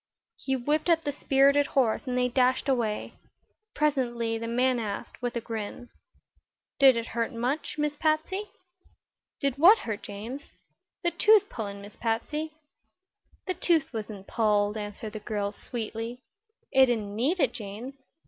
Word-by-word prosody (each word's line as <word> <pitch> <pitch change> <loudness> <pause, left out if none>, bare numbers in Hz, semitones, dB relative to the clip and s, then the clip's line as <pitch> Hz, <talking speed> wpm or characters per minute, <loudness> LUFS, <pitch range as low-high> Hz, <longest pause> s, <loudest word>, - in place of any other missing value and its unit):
He 265 - -1
whipped 295 +6 0
up 330 -1 +4
the 290 - -2
spirited 280 +1 +4
horse 245 -1 +2
and 250 0 -1
they 250 0 +3
dashed 255 +2 +2
away. 235 -6 0 0.6
Presently 240 -6 0
the 230 - -4
man 250 +1 +2
asked, 210 +1 -5
with 245 0 -2
a 235 - -1
grin: 225 +1 -6 0.9
"Did 265 -3 +7
it 230 - -2
hurt 235 +1 -1
much, 255 +7 -2
Miss 300 0 0
Patsy?" 325 +7 0 0.9
"Did 275 -2 -1
what 380 +8 +8
hurt, 220 - -4
James?" 220 +7 -7 0.6
"The 345 - +2
tooth 425 +1 +5
pullin', 200 -3 -5
Miss 205 +1 -12
Patsy." 300 +8 -2 0.9
"The 370 - -1
tooth 330 -7 +1
wasn't 210 -3 -6
pulled," 210 -2 +1
answered 210 0 -6
the 215 - -5
girl, 205 -1 -2
sweetly. 230 +3 -6 0.5
"It 265 -1 +6
didn't 215 -4 -1
need 285 - +1
it, 265 -6 +2
James. 220 +3 -7
245 Hz, 150 wpm, -28 LUFS, 220-285 Hz, 0.9 s, what